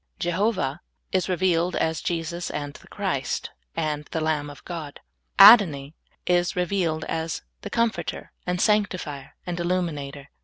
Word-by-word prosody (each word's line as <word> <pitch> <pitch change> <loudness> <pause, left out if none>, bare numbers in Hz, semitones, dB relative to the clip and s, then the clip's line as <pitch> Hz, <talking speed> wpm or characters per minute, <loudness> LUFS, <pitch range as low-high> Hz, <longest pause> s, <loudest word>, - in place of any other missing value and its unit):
Jehovah 175 -4 0 0.3
is 185 0 0
re 185 - +2
vealed 175 0 +1
as 160 -1 0
Jesus 170 0 -3
and 145 -1 -4
the - - -15
Christ - - -2 0.2
and 150 -1 -2
the 160 - -3
lamb 155 -2 0
of 145 - -13
God. 160 -5 -6 0.4
Adoni 190 -10 +8 0.3
is 175 0 +2
revealed 180 -3 0
as 160 0 -3 0.2
the - - -6
Comforter 230 -1 -1 0.2
and 180 0 0
Sanctifier 185 -10 0
and 175 -1 -3
Illuminator. 150 -6 -2
170 Hz, 140 wpm, -25 LUFS, 150-185 Hz, 0.4 s, Adoni